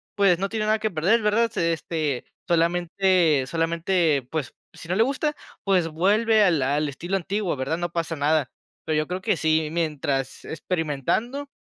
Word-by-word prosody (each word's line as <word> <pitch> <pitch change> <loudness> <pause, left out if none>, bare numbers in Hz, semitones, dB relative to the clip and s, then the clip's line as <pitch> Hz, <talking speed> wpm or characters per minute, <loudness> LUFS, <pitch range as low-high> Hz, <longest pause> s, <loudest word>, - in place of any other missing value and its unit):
pues, 195 -4 +4
no 195 - 0
tiene 220 0 -2
nada 215 +1 +2
que 215 -1 -1
perder, 185 +9 +2
¿verdad? 220 +2 +2
Se 170 0 0
este, 155 -5 -3 0.2
solamente 170 -2 +2
solamente, 165 -3 0
pues, 150 -5 -3 0.2
si 165 - -12
no 180 - +1
le 220 - +4
gusta, 280 +4 -1 0.3
pues, 185 -5 +2
vuelve 210 +7 +3
al 170 -7 +3
al 145 +3 0
estilo 175 +7 -4
antiguo, 195 -1 -2
¿verdad?, 140 +5 -2
no 175 0 -2
pasa 165 -1 -2
nada. 145 -1 +1 0.3
Pero 155 -1 0
yo 155 - -2
creo 180 +1 -3
que 190 - +1
sí, 160 -1 +1
mientras 145 -5 -2
experimentando 180 - -2
170 Hz, 170 wpm, -24 LUFS, 155-195 Hz, 0.3 s, pues